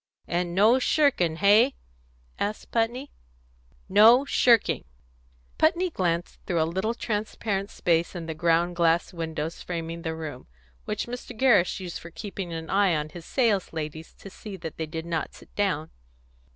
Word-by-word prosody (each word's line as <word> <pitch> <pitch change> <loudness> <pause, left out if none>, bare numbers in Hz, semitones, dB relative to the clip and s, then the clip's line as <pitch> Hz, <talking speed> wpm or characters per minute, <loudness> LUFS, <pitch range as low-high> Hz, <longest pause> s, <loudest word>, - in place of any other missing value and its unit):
"And 175 0 -2
no 220 +6 +5
shirking, 255 - +2
hey?" 210 +9 +5 0.6
asked 210 +1 -3
Putney. 240 +5 -1 0.8
"No 220 +7 +7
shirking." 235 -5 +3 0.8
Putney 345 +3 +2
glanced 175 - -2
through 175 -2 0
a - - +4
little 190 +8 -2
transparent 210 -2 -2
space 170 +1 0
in 170 -2 -5
the 160 - -4
ground 170 +2 +1
glass 170 +1 +2
windows 160 -1 -4
framing 165 -1 -5
the 160 -1 -3
room, 155 -5 -7 0.4
which - - -2
Mr. 245 -1 -8
Gerrish 220 -9 +3
used 180 -3 -6
for 170 - -10
keeping 195 0 -6
an 165 0 -5
eye 195 -2 +3
on 150 0 -2
his 165 +1 -10
sales 220 -10 +1
ladies 160 0 -6
to 195 - -12
see 200 0 -9
that 165 -2 -7
they 160 - -3
did 160 +1 -5
not 165 -2 -3
sit - - -17
down. 185 -7 -1
180 Hz, 155 wpm, -26 LUFS, 165-215 Hz, 0.8 s, No